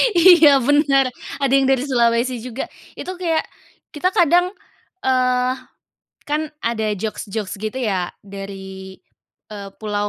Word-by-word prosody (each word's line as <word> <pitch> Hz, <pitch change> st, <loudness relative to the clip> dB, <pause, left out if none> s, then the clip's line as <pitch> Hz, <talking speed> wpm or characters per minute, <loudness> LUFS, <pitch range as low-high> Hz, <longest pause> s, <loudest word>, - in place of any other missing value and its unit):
Iya 330 Hz, -5 st, +7 dB
benar, 275 Hz, 0 st, +3 dB, 0.3 s
ada 275 Hz, -1 st, +1 dB
yang 275 Hz, -1 st, +4 dB
dari 265 Hz, -1 st, +2 dB
Sulawesi 240 Hz, 0 st, +2 dB
juga, 250 Hz, +1 st, -5 dB, 0.3 s
itu 370 Hz, -, -6 dB
kayak, 335 Hz, -3 st, 0 dB, 0.5 s
kita 335 Hz, +5 st, +1 dB
kadang, 355 Hz, -1 st, +3 dB, 0.5 s
eee, 255 Hz, 0 st, +2 dB, 0.7 s
kan 305 Hz, +1 st, -1 dB, 0.2 s
ada 225 Hz, -2 st, 0 dB
jokes-jokes 205 Hz, -1 st, -5 dB
gitu 220 Hz, +4 st, -4 dB
ya, 190 Hz, -6 st, -1 dB, 0.2 s
dari, 190 Hz, -1 st, -9 dB, 0.6 s
eee, 200 Hz, -1 st, -7 dB
pulau 205 Hz, -1 st, -2 dB
255 Hz, 120 wpm, -20 LUFS, 210-290 Hz, 0.7 s, Iya